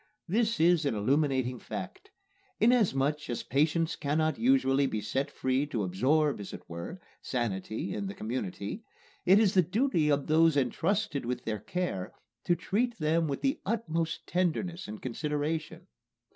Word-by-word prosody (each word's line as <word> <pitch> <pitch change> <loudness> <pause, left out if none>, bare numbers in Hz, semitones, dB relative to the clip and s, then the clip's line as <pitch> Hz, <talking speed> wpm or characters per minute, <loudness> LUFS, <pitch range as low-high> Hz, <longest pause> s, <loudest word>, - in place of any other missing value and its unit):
This 225 +5 +1
is 170 0 +4
an 120 - 0
illuminating 130 +2 +1
fact. 405 - -7 0.5
Inasmuch 150 - +2
as 120 - -2
patients 155 +4 +1
cannot 155 +2 0
usually 230 - +3
be 110 - -2
set 130 +7 -2
free 130 +1 0
to 115 -7 -2
absorb, 135 - +2
as 100 - -7
it - - -9
were, 85 - -7 0.2
sanity 115 - -2
in 200 - -3
the 195 - -6
community, 110 - -4 0.4
it 190 +2 +8
is 210 -3 +4
the 185 - +6
duty 180 - +1
of 145 -1 +2
those 160 -1 +4
entrusted 165 - 0
with 125 +1 -3
their 110 -2 -2
care 105 - -3 0.3
to 175 - +3
treat 230 +7 -1
them 160 +1 +1
with 140 - -3
the 275 0 +1
utmost 170 -7 -2
tenderness 175 0 -1
and 105 +1 -8
consideration. 150 +4 -3
155 Hz, 150 wpm, -30 LUFS, 130-180 Hz, 0.5 s, it